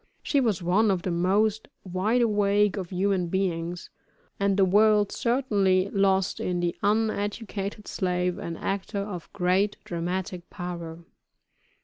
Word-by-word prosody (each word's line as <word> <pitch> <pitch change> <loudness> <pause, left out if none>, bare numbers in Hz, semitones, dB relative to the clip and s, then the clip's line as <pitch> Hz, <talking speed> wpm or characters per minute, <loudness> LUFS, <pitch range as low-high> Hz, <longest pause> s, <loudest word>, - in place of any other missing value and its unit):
She 285 - +2
was 215 -9 0
one 200 +5 +3
of 185 -3 0
the 185 - -1
most 200 +5 +1 0.2
wide 200 +7 +1
awake 205 -2 +2
of 185 -4 -5
human 190 -1 0
beings, 175 -2 -2 0.5
and 200 0 +2
the 195 - +5
world 210 +1 +4
certainly 200 -7 +1
lost 195 -1 +2
in 180 -1 -1
the 175 -1 -1
uneducated 205 -1 -1
slave, 180 -1 -1
an 165 -1 -5
actor 200 +1 -3
of 195 -5 -7
great 195 +2 +1
dramatic 180 +1 -4
power. 170 -2 -6
195 Hz, 130 wpm, -26 LUFS, 180-205 Hz, 0.5 s, the